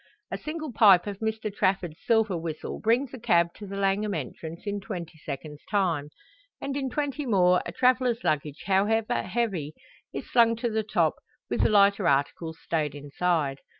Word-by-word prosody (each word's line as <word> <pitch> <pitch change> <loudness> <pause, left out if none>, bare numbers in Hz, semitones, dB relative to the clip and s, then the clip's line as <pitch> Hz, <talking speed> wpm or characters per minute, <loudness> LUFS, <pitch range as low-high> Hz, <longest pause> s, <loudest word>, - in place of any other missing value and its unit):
A - - -2
single 310 -2 -5
pipe 195 -5 +6
of 200 -1 -5
Mr 220 -1 -2
Trafford's 185 -5 0
silver 220 -4 +2
whistle 165 -2 -5
brings 245 +4 +1
a 260 - -7
cab 170 -7 +2
to 205 - -10
the 195 - -6
Langham 200 +1 0
entrance 160 - -6
in 205 0 -2
twenty 175 -5 -7
seconds 150 +1 -7
time; 170 -8 0 0.5
and 275 0 -4
in 270 -2 -1
twenty 285 +1 -2
more 180 -4 +4
a - - -4
traveller's 250 +2 +2
luggage 150 -1 -1
however 215 +5 +2
heavy 190 -11 -2 0.4
is - - -6
slung 230 -1 +4
to 230 +1 -2
the 220 0 +1
top, 215 - +1 0.3
with - - +1
the - - +4
lighter 200 -2 +4
articles 145 +4 0
stowed 150 -3 -2
inside. 145 0 -1
195 Hz, 170 wpm, -27 LUFS, 165-225 Hz, 0.5 s, pipe